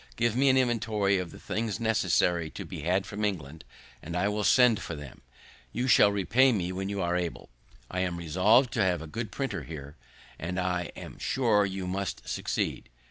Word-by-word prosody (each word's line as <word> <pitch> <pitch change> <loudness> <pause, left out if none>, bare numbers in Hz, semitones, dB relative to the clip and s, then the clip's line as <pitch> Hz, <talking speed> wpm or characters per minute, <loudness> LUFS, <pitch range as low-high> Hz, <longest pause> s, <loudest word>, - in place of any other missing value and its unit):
Give 115 -1 +1
me 135 +2 +4
an 130 - +4
inventory 110 -6 +1
of 90 -2 -4
the - - -12
things 110 -1 -3
necessary 90 -7 +1
to - - -8
be - - -7
had 90 +4 +1
from 105 +2 -5
England, 80 -7 -3 0.4
and 85 +2 -6
I 100 +3 +1
will 105 0 -1
send 125 -1 +5
for 85 - -5
them. 75 -3 -10 0.5
You 125 +2 -2
shall 105 -4 +6
repay 115 +7 +3
me 90 -5 -1
when 95 +1 -3
you 100 -2 -2
are 85 0 0
able; 90 -2 -3 0.4
I 90 - -4
am 90 -2 -1
resolv'd 100 - +3
to - - +2
have 90 -3 0
a - - -7
good 110 +7 -5
printer 125 -5 -3
here, 75 -2 -9 0.4
and 90 +3 -3
I 90 -1 -1
am - - -10
sure 110 -6 +2
you 95 -1 -4
must 95 +1 -4
succeed." - - -2
95 Hz, 195 wpm, -28 LUFS, 90-110 Hz, 0.5 s, shall